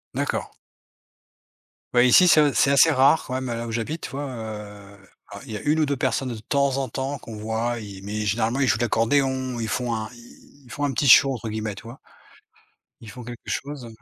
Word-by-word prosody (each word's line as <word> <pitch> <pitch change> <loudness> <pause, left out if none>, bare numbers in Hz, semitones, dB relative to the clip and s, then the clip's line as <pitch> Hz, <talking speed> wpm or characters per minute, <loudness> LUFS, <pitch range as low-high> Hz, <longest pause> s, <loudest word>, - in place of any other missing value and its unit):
D'accord. - - -2 1.5
Ouais, 120 +1 +6
ici, 180 +8 +6
c'est, 165 - +6
heu, 145 -1 +3
c'est 135 - +3
assez 140 +4 +5
rare 140 +3 +4
quand 130 - -6
même 130 0 -3
là 115 -1 -4
où 115 - -6
j'habite, 120 +9 -3
tu - - -6
vois, 140 +2 -4
heu, 105 -4 -8 0.3
alors - - -11
il - - -8
y 105 - -4
a - - -9
1 150 +2 +1
ou 155 - +2
2 140 -1 -1
personnes 130 +1 -1
de 120 - -5
temps 140 +4 0
en 135 -1 -1
temps 135 +4 -4
qu'on 115 -3 -10
voit, 110 +3 -2
i 100 -3 -9
mais 105 +1 -3
généralement, 115 +5 0
ils 140 - +2
jouent 100 -2 +2
de 120 - -1
l'accordéon, 130 +2 0
ils 115 - -3
font 120 +1 -2
un 110 -1 -4
ils 120 0 -15 0.3
ils 120 - -15
font 145 - -4
un 145 - +1
«petit 140 - 0
show», 135 +2 +7
entre 115 -3 -6
guillemets, 110 -1 -4
tu - - -11
vois? 120 +3 -11 1.0
Ils 110 - -11
font 125 - -10
quelque 120 0 -9
chose. 140 -3 -5
120 Hz, 230 wpm, -23 LUFS, 110-135 Hz, 1.5 s, show